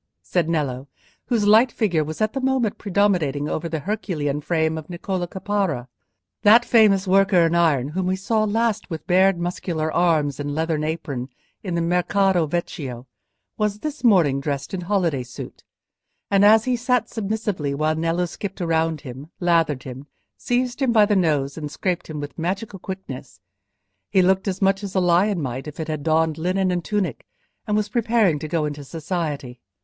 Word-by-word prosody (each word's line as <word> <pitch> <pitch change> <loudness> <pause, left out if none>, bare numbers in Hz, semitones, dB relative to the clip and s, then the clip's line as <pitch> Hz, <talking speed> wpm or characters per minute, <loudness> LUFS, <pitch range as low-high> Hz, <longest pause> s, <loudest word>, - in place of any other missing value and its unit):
said 170 -3 0
Nello, 140 -5 -2 0.4
whose 230 -5 +1
light 220 +4 +6
figure 175 -10 +1
was 155 +4 -6
at 215 0 +1
that 270 - -2
moment 260 -5 0
predominating 180 -8 +1
over 165 +2 -3
the 160 -2 -3
Herculean 150 -7 -2
frame 160 0 0
of 155 -1 -7
Niccolò 180 0 -3
Caparra. 190 -9 -2 0.5
That 230 +3 +6
famous 210 -4 +4
worker 190 -2 +4
in 165 - +1
iron, 155 -6 +2
whom 180 +4 -2
we 185 - +1
saw 215 +3 0
last 220 0 0
with 160 -2 -6
bared 190 +1 +4
muscular 170 -2 -2
arms 155 -6 +2
and 145 0 -3
leathern 160 -1 -1
apron 145 -5 -4 0.3
in 180 -4 -3
the 170 - 0
Mercato 180 0 +2
Vecchio, 140 -6 -4 0.5
was 210 -1 0
this 305 -2 -5
morning 165 - +4
dressed 140 +1 -3
in 185 - -2
holiday 175 -7 0
suit, 125 0 -9 0.7
and 200 0 +4
as 215 +1 +6
he 255 -1 +1
sat 245 -1 +1
submissively 205 -9 -2
while 155 +2 +1
Nello 165 +2 0
skipped 195 +3 -7
round 165 -3 0
him, 135 +2 -9
lathered 165 -6 +2
him, 130 +2 -9 0.3
seized 245 +1 -1
him 260 -3 +3
by 215 -3 +6
the 205 0 +1
nose, 150 -5 +1
and 150 -1 -5
scraped 180 +3 -2
him 155 -1 -5
with 145 +3 -7
magical 195 +4 -3
quickness, 155 - -8 0.7
he 190 - +4
looked 190 +1 +1
much 195 +1 +2
as 195 -1 -6
a - - +4
lion 180 +2 +3
might 130 0 -4
if 150 - -9
it 160 0 -4
had 155 -2 -3
donned 160 +1 +1
linen 185 +2 0
and 175 -1 -1
tunic 190 - -2 0.4
and 210 0 +1
was 210 0 0
preparing 220 -7 +2
to 155 - -5
go 160 -1 0
into 145 -1 -5
society. 150 -5 -4
175 Hz, 175 wpm, -22 LUFS, 155-200 Hz, 0.7 s, light